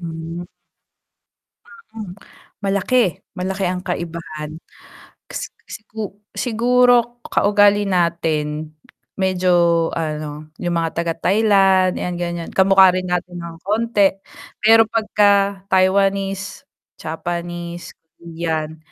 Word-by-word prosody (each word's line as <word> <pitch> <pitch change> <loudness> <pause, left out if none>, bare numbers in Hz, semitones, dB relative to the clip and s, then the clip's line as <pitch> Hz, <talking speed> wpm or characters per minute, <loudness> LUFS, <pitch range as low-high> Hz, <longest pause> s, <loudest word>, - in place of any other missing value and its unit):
Hmm. 165 0 -6 1.2
Ah, 465 0 -17
um, 215 -5 -7 0.5
malaki, 200 -1 +1 0.2
malaki 190 +1 -2
ang 180 0 -4
kaibahan. 165 -3 -5 0.8
Kas - - -5
kasi - - -9
sigu 210 -1 -8
siguro 245 0 +2
kaugali 205 0 +4
natin, 155 -4 -1 0.4
medyo 175 -3 +2
ano, 155 -1 -4
'yong 175 -1 -1
mga 165 -1 0
taga-Thailand, 190 +2 +3
'yan 180 0 -3
gan'yan, 170 -1 -4
kamukha 190 0 +6
rin 185 0 -2
natin 180 0 -2
ng 170 -1 -8
konti, 210 -1 +2 0.5
pero 225 +1 +6
pagka-Taiwanese, 195 -2 +1 0.3
Japanese, 170 +1 -5 0.3
Korean, 160 -2 -4
185 Hz, 90 wpm, -20 LUFS, 170-205 Hz, 1.2 s, kamukha